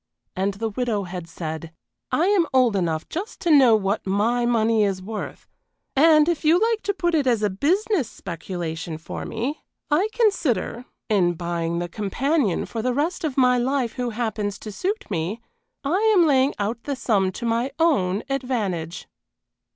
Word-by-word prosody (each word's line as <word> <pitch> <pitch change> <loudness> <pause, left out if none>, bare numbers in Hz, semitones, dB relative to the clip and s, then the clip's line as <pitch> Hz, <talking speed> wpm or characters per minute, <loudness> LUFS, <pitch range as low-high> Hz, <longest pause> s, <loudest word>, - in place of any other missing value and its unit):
And 195 +1 -1
the 225 +2 -2
widow 220 -2 -1
had 180 -2 -7
said: 160 0 -6 0.4
"Now - - +2
look 320 - +3
here, 405 - +3
I - - +4
am 340 -5 +3
old 250 -5 +4
enough 165 -4 -1
just 380 +7 -5
to 345 - +1
know 265 -6 +7
what 200 0 -1
my 230 +5 +1
money 225 -2 +3
is 195 -2 0
worth 210 +3 -7 0.5
and 305 +1 +6
if 345 -3 0
you 320 +3 +5
like 450 +1 +1
to 405 - -1
put 345 -3 0
it 295 -4 +2
as 230 -4 +2
a 205 - +2
business 345 - +1
speculation 165 -2 -5
for 160 - -7
me, 245 +7 -3 0.3
I 345 +8 +3
consider, 355 - 0 0.2
in 185 -5 +2
buying 170 0 -2
the 175 0 -2
companion 220 - 0
for 225 - -4
the 250 +1 0
rest 320 +6 -1
of 295 -4 -2
my 250 -1 +4
life 255 -2 0
who 250 -1 -2
happens 215 -3 -2
to 215 - -6
suit 395 - -2
me, 180 +5 -2 0.4
I 315 +7 +1 0.2
am 345 - +6
laying 275 -2 +3
out 215 +3 -2
the 285 - -2
sum 205 -6 +1
to 235 - -5
my 230 +3 +1
own 215 - +2
advantage." 215 -12 -2
230 Hz, 180 wpm, -23 LUFS, 190-290 Hz, 0.5 s, know